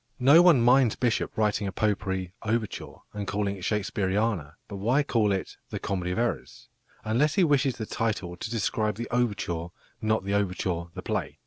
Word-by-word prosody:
No 140 +5 +7
one 175 -8 +6
minds 125 -1 +5
Bishop 120 -2 -1
writing 105 -1 +1
a - - -2
potpourri 95 -3 -1
overture 110 -1 -3 0.2
and 105 -1 -5
calling 100 0 -1
it 95 - -11
"Shakespeariana," 100 -5 -1
but 100 - -7
why 120 +9 +2
call 115 -7 +1
it 95 -1 -3
"The - - -4
Comedy 90 -3 -3
of 90 - -2
Errors"? 115 - -3 0.3
unless 135 +7 +1
he 190 - +4
wishes 140 -4 +2
the 110 - -4
title 105 -6 -2
to 100 - -6
describe 110 -1 -1
the 120 +1 -5
overture, 105 -9 -1 0.3
not 110 -2 +1
the 100 - -1
overture 90 -3 -1
the - - -6
play. - - -3
105 Hz, 180 wpm, -27 LUFS, 95-120 Hz, 0.3 s, No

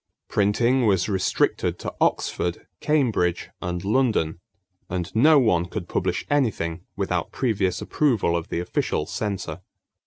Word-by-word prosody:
Printing 115 +5 +2
was 95 -3 +2
restricted 95 -3 0
to - - -5
Oxford, 85 -1 0
Cambridge, 115 - +1
and 90 0 -3
London; 105 -8 +1 0.5
and 90 +1 -4
no 150 +7 +6
one 90 -10 +3
could 90 -1 -5
publish - - -1
anything 105 - 0
without 90 -4 -2
previous 100 -8 0
approval 115 - +1
of 85 -1 -2
the - - -2
official 90 - -1
censor. 95 -5 -4
100 Hz, 125 wpm, -24 LUFS, 90-120 Hz, 0.5 s, no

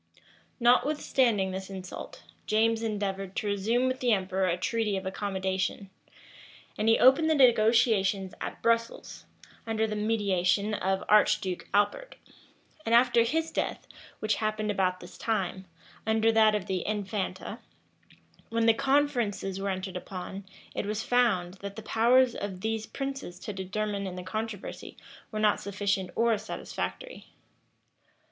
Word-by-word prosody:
Notwithstanding 245 -5 +2
this 190 +1 -6
insult, 190 -2 -8 0.2
James 225 +1 +2
endeavored 195 -3 -3
to - - -2
resume 215 +5 +1
with 255 0 -1
the 245 -2 +3
emperor 190 -1 0
a 175 0 +1
treaty 210 +1 -1
of 190 - -5
accommodation; 190 0 -2 0.8
and 220 - +1
he 225 - +5
opened 270 +5 +5
the 315 - +4
negotiations 220 -6 +3
at - - -6
Brussels, 230 0 -1 0.4
under 220 0 +1
the 215 -1 -3
mediation 205 -2 +1
of 190 -1 -1
Archduke 210 -3 +2
Albert; 205 - 0 0.7
and, 230 -3 +2
after 240 -1 +5
his 320 +8 0
death, - - -3 0.4
which 215 0 +1
happened 215 -1 -1
about 185 -2 0
this 175 - -12
time, 190 -4 -2 0.4
under 220 0 +3
that 220 -1 +5
of 205 -3 -2
the 185 -2 -2
infanta: 205 0 -3 0.9
when 230 0 +1
the 225 - +6
conferences 250 -8 0
were 200 - -1
entered 190 0 -4
upon, 190 +1 -7 0.3
it - - -3
was 215 +1 -2
found, 200 -7 +1
that 200 0 -7
the 220 - -8
powers 245 +3 +4
of 190 -2 -5
these 220 0 -2
princes 270 -10 -5
to 210 - -6
determine 200 +1 -3
in 185 - -6
the 180 - -6
controversy 215 +2 -6 0.3
were 215 - -4
not 215 -1 +3
sufficient 200 -2 -1
or 230 0 +3
satisfactory. - - -6
210 Hz, 140 wpm, -28 LUFS, 190-230 Hz, 0.9 s, the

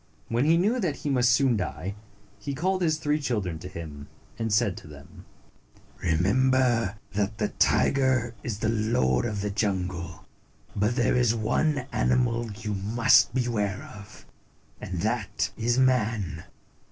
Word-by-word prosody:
When 120 +4 +1
he 165 +2 +4
knew 215 +8 +2
that 175 -9 -1
he 145 - -3
must 125 -3 +3
soon 125 0 +3
die, 90 +1 -4 0.5
he 140 +7 -4
called 185 +5 0
his 160 -3 +2
three 150 0 0
children 100 - -2
to 90 - -8
him, 75 -5 -8 0.3
and 115 -1 -2
said 105 -3 +2
to - - -11
them, 75 -1 -14 0.4
" - - -29
Remember 115 +5 +2 0.2
that 105 +1 -1
the 105 -2 0
tiger 130 -4 +2
is 115 -4 -4
the 110 +1 -1
lord 105 - +1
of 105 -2 -2
the 105 0 -2
jungle, 95 -4 -3 0.5
but 105 +4 +1
there 120 - +2
is 120 -2 +3
one 125 +5 0
animal 120 -2 +1
you 105 +1 -5
must 110 +4 +3
beware 105 -6 -1
of, 100 0 -13 0.6
and 90 -2 -4
that 105 -3 -1
is 120 +2 0
man. 110 -9 +1
110 Hz, 155 wpm, -26 LUFS, 95-125 Hz, 0.6 s, he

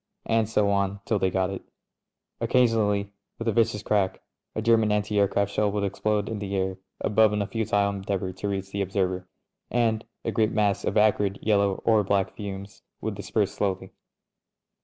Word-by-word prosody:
And 115 -1 +1
so 105 -2 +2
on 100 0 0
till 110 - +1
they 95 - +2
got 95 +1 0
it. 95 - -5 0.8
Occasionally, 105 -5 +2 0.2
with 115 - -5
a - - +4
vicious 115 -1 +1
crack, 100 -3 0 0.3
a 110 - -1
German 110 -2 +4
anti 105 0 +1
aircraft 100 0 +2
shell 105 0 +1
would 105 0 -1
explode 105 +1 0
in 110 -2 -4
the 100 -1 -3
air 95 0 -1 0.2
above 105 0 +4
in 105 - 0
a - - -3
futile 105 -2 0
endeavour 95 -1 -3
to 100 +3 -4
reach 95 -1 -3
the 100 - -2
ob 95 -1 -3
server, 95 -2 -1 0.4
and 115 -2 +1 0.2
a - - 0
great 110 0 +1
mass 105 -2 +1
of - - 0
acrid 105 -2 +3
yellow 100 -2 +2
or 110 -2 +4
black 100 0 +1
fumes 100 -1 -7 0.2
would - - -3
disperse - - -1
slowly. 95 -2 -2
100 Hz, 180 wpm, -26 LUFS, 100-110 Hz, 0.8 s, a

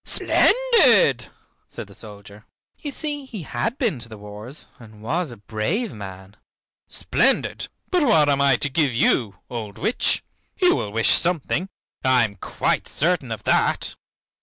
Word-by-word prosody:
"Splendid!" 275 - +4 0.4
said - - -8
the - - -15
soldier. 100 0 -11 0.3
You 295 - -5
see 290 0 -2
he 220 -9 -8
had 135 - -3
been 220 - -1
to 115 0 -8
the 110 - -10
wars 105 +6 -7
and 110 -2 -15
was 155 +5 -1
a 120 - -10
brave 115 - -2
man. 95 -1 -10 0.5
"Splendid! - - +1 0.2
But 360 -2 +3
what 160 - +4
am 140 -1 +2
I 140 -2 +5
to 145 - -1
give 140 -2 +1
you, 110 -4 +2
old 110 -4 -6
witch? 230 - +1 0.4
You 360 -1 +4
will - - -3
wish 115 +1 +2
something, 175 +1 +1 0.3
I 130 -2 +4
am 100 -2 -8
quite - - -1
certain - - 0
of - - -5
that." - - +1
130 Hz, 155 wpm, -22 LUFS, -, 0.5 s, I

